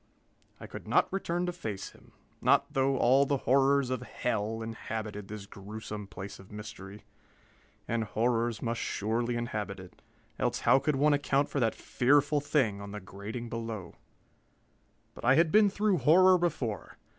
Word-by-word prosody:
I -, -, -8 dB
could -, -, -9 dB
not -, -, +2 dB
return 175 Hz, -2 st, -1 dB
to 180 Hz, -, -1 dB
face 105 Hz, -, -5 dB
him, -, -, -21 dB, 0.3 s
not -, -, +3 dB
though 135 Hz, 0 st, +2 dB
all 135 Hz, +3 st, +4 dB
the 140 Hz, -, +1 dB
horrors 135 Hz, 0 st, +3 dB
of 130 Hz, -, -1 dB
hell 110 Hz, -1 st, -2 dB
inhabited 110 Hz, -2 st, -5 dB
this 105 Hz, -1 st, -7 dB
gruesome 105 Hz, +1 st, -8 dB
place 95 Hz, +2 st, -8 dB
of 95 Hz, +1 st, -15 dB
mystery. 105 Hz, -1 st, -9 dB, 0.8 s
And 115 Hz, -1 st, -1 dB
horrors 115 Hz, +1 st, 0 dB
must 115 Hz, -1 st, -2 dB
surely 115 Hz, +4 st, -1 dB
inhabit 105 Hz, -4 st, -3 dB
it, 95 Hz, -1 st, -13 dB, 0.4 s
else -, -, 0 dB
how 135 Hz, -, +5 dB
could 145 Hz, +1 st, 0 dB
one 145 Hz, +2 st, +4 dB
account 140 Hz, 0 st, +1 dB
for 140 Hz, -, -2 dB
that 115 Hz, -3 st, +1 dB
fearful 145 Hz, +3 st, +2 dB
thing 120 Hz, -9 st, +1 dB
on 100 Hz, -, -7 dB
the 105 Hz, -, -5 dB
grating 105 Hz, +5 st, -7 dB
below? 115 Hz, -6 st, -5 dB, 1.2 s
But -, -, -12 dB
I 130 Hz, +3 st, +5 dB
had 165 Hz, +1 st, +4 dB
been 210 Hz, -1 st, +6 dB
through 205 Hz, -2 st, +1 dB
horror 180 Hz, +7 st, +6 dB
before. 120 Hz, -, -2 dB
115 Hz, 160 wpm, -30 LUFS, 105-140 Hz, 1.2 s, been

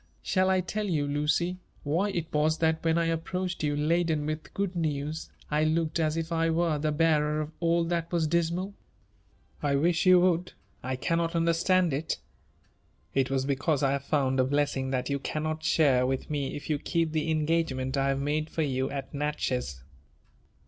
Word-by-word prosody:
Shall 185 Hz, -1 st, +2 dB
I 190 Hz, -1 st, +3 dB
tell 210 Hz, +4 st, -3 dB
you, 155 Hz, -6 st, 0 dB
Lucy, 150 Hz, +5 st, 0 dB, 0.2 s
why 170 Hz, +8 st, +1 dB
it 170 Hz, -5 st, -4 dB
was 155 Hz, +1 st, +2 dB
that 160 Hz, -1 st, +1 dB
when 165 Hz, 0 st, +2 dB
I 170 Hz, -, +2 dB
approached 175 Hz, +3 st, -2 dB
you 145 Hz, -1 st, 0 dB
laden 160 Hz, 0 st, +1 dB
with 155 Hz, +1 st, -4 dB
good 195 Hz, -2 st, -1 dB
news, 155 Hz, -1 st, -2 dB, 0.2 s
I 150 Hz, +1 st, +2 dB
looked 160 Hz, +1 st, +1 dB
as 155 Hz, 0 st, +1 dB
if 165 Hz, +1 st, -3 dB
I 165 Hz, 0 st, +1 dB
were 165 Hz, -2 st, +1 dB
the 155 Hz, +1 st, 0 dB
bearer 150 Hz, -1 st, +2 dB
of 155 Hz, 0 st, -3 dB
all 170 Hz, 0 st, +2 dB
that 170 Hz, 0 st, -2 dB
was 170 Hz, -2 st, +1 dB
dismal 170 Hz, +3 st, 0 dB
V -, -, -17 dB, 0.5 s
" 65 Hz, +2 st, -35 dB
I 140 Hz, -, +2 dB
wish 165 Hz, +5 st, +2 dB
you 185 Hz, -1 st, +8 dB
would; 180 Hz, -1 st, +1 dB, 0.2 s
— -, -, -36 dB
I -, -, 0 dB
cannot 165 Hz, +5 st, -1 dB
understand 170 Hz, +1 st, +2 dB
it." 155 Hz, +4 st, -2 dB, 1.0 s
It 135 Hz, -1 st, +1 dB
was 135 Hz, -1 st, 0 dB
because 140 Hz, +1 st, 0 dB
I 135 Hz, -, +3 dB
have 140 Hz, -1 st, -1 dB
found 135 Hz, -3 st, +1 dB
a -, -, +5 dB
blessing 135 Hz, -1 st, 0 dB
that 130 Hz, +1 st, -1 dB
you 140 Hz, -, 0 dB
cannot 155 Hz, +2 st, -3 dB
share 140 Hz, -5 st, +3 dB
with 135 Hz, +3 st, -2 dB
me 140 Hz, -3 st, -2 dB
if 145 Hz, -, -7 dB
you 150 Hz, -2 st, 0 dB
keep 165 Hz, 0 st, 0 dB
the 160 Hz, 0 st, -1 dB
engagement 155 Hz, -4 st, 0 dB
I 135 Hz, 0 st, +1 dB
have 135 Hz, 0 st, +1 dB
made 150 Hz, +2 st, -1 dB
for 160 Hz, -, -1 dB
you 130 Hz, -2 st, -1 dB
at 140 Hz, +1 st, -6 dB
Natchez." 130 Hz, -, -2 dB
155 Hz, 195 wpm, -28 LUFS, 145-170 Hz, 1.0 s, you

